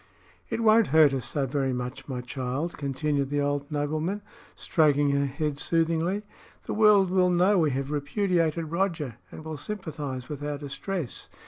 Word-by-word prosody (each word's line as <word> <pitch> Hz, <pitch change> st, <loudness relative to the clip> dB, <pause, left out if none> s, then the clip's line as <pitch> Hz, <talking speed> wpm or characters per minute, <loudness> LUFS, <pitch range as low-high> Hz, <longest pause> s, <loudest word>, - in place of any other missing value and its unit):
"It -, -, -2 dB
won't 220 Hz, -1 st, +5 dB
hurt 155 Hz, -1 st, +5 dB
us 130 Hz, -3 st, -2 dB
so 140 Hz, -3 st, -1 dB
very 135 Hz, 0 st, -1 dB
much, 125 Hz, +1 st, -5 dB
my 130 Hz, -3 st, -4 dB
child," 130 Hz, +6 st, -3 dB
continued 140 Hz, 0 st, -1 dB
the 145 Hz, 0 st, 0 dB
old 145 Hz, +1 st, -1 dB
nobleman, 155 Hz, +7 st, -2 dB, 0.3 s
stroking 145 Hz, -3 st, +2 dB
her 140 Hz, 0 st, +1 dB
head 145 Hz, +1 st, -3 dB
soothingly. 165 Hz, +5 st, +1 dB, 0.4 s
"The -, -, -4 dB
world 210 Hz, -3 st, +5 dB
will 185 Hz, -1 st, +4 dB
know 180 Hz, +3 st, +4 dB
we 155 Hz, -3 st, +3 dB
have 135 Hz, +1 st, -2 dB
repudiated 165 Hz, +1 st, 0 dB
Roger, 165 Hz, -, -1 dB
and 155 Hz, -, -10 dB
will 160 Hz, -1 st, -5 dB
sympathise 145 Hz, -9 st, -5 dB
with 145 Hz, -1 st, -6 dB
our 145 Hz, 0 st, -2 dB
distress. 145 Hz, +2 st, -4 dB
150 Hz, 160 wpm, -27 LUFS, 140-175 Hz, 0.4 s, won't